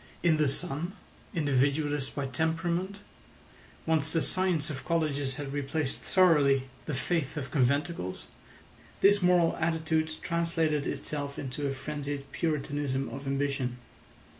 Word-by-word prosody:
In 165 -3 +4
the 150 -2 +3
son, 170 +4 -2 0.4
individualist 145 -1 +1
by 140 - -1
temperament, 170 +8 -1 0.8
once 160 -1 +2
the 165 - +2
science 180 -5 +1
of 135 -2 -6
colleges 145 -4 0
had 140 -1 -5
replaced 145 0 -1
thoroughly 150 -8 +4 0.2
the 150 - -1
faith 155 +1 -1
of 140 -2 -4
conventicles, 140 - 0 0.8
this 205 +1 +6
moral 180 -2 +4
attitude 160 -1 0
translated 165 -3 +1
itself 145 -2 -3
into 140 +2 -3
a 135 - -1
frenzied 145 0 -5
puritanism 145 -4 -1
of 135 +1 -7
ambition. 135 -3 -1
150 Hz, 120 wpm, -29 LUFS, 140-165 Hz, 0.8 s, this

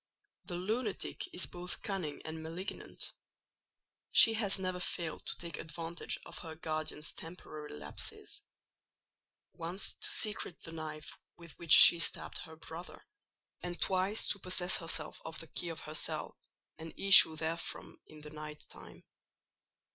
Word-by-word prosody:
The 175 - -5
lunatic 210 +4 -2
is 180 - -2
both 180 +1 -5
cunning 185 -8 -4
and 160 0 -6
malignant; 165 +4 -6 1.0
she 225 - +9
has 210 -3 +1
never 185 -1 -3
failed 170 -2 -3
to - - +1
take 170 -3 -5
advantage 165 +1 -4
of - - -8
her 160 -2 -6
guardian's 155 -1 -3
temporary 155 - -8
lapses; 75 -1 -6 1.1
once 170 +4 -3
to - - +3
secrete 210 -5 -1
the 165 - -9
knife 155 -1 -7 0.2
with 170 -1 -12
which 170 -2 +5
she 170 - +10
stabbed 165 - 0
her 160 -2 -8
brother, 165 +2 -10 0.6
and 175 0 -5
twice 190 +3 +2
to 205 - 0
possess 185 0 +1
herself 165 -2 -2
of 160 - -7
the - - -7
key 170 +1 -4
of 165 - -6
her 155 - -8
cell, - - -1 0.4
and 160 0 -9
issue 195 -5 +9
therefrom 165 +2 -4
in 155 -1 -13
the 150 0 -10
night 150 0 -9
time. - - -12
165 Hz, 145 wpm, -33 LUFS, 160-185 Hz, 1.1 s, she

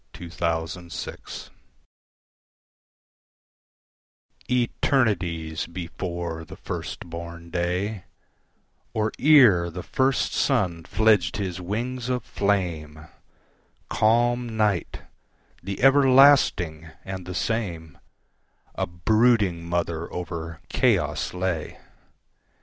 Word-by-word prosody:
Mother 85 0 -3
Night 85 +1 -8 3.0
ETERNITIES 105 - 0
before 85 -1 -5
the 80 - -11
first - - -6
born 85 0 -8
day, 90 +3 -2 0.9
Or 110 0 +1
ere 120 - +6
the 90 +2 -7
first 130 0 +1
sun 85 -4 0
fledged 105 -4 +2
his 95 -3 -3
wings 120 +6 -3
of 125 -2 -1
flame, 80 -7 -2 0.8
Calm 120 +1 +2
Night, 105 -6 0 0.6
the 95 +2 -5
everlasting 135 - +5 0.2
and 95 -2 -6
the 90 - -5
same,A 95 -2 -5
brooding 95 -1 +2
mother 85 -1 -2
over 85 -2 -6
chaos - - +1
lay. 90 -3 -3
90 Hz, 80 wpm, -25 LUFS, 85-110 Hz, 3.0 s, ere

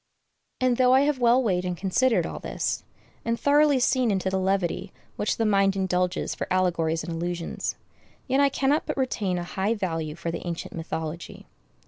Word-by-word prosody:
And 255 -2 +2
though 255 0 +5
I 265 - +6
have 285 -2 +1
well 245 +2 +4
weighed 185 -5 +1
and 180 -1 -3
considered 225 +7 +2
all - - -5
this, - - -3 0.4
and 230 0 -1
thoroughly 290 -1 +4
seen 255 -1 +2
into 190 -2 0
the 190 - 0
levity 190 0 -1 0.2
which 210 - -1
the 225 - +1
mind 195 -2 +3
indulges 180 -1 0
for - - -4
allegories 170 -3 +1
and 170 - -5
allusions, 170 0 -3 0.5
yet 265 +1 +2
I 280 0 +5
cannot 275 +2 +1
but - - -3
retain 215 -8 -1
a 175 - -3
high 195 +5 -1
value 165 -6 -3
for 170 0 -4
the 170 - -5
ancient 170 -1 -5
mythology. 160 0 -5
190 Hz, 180 wpm, -26 LUFS, 175-250 Hz, 0.5 s, I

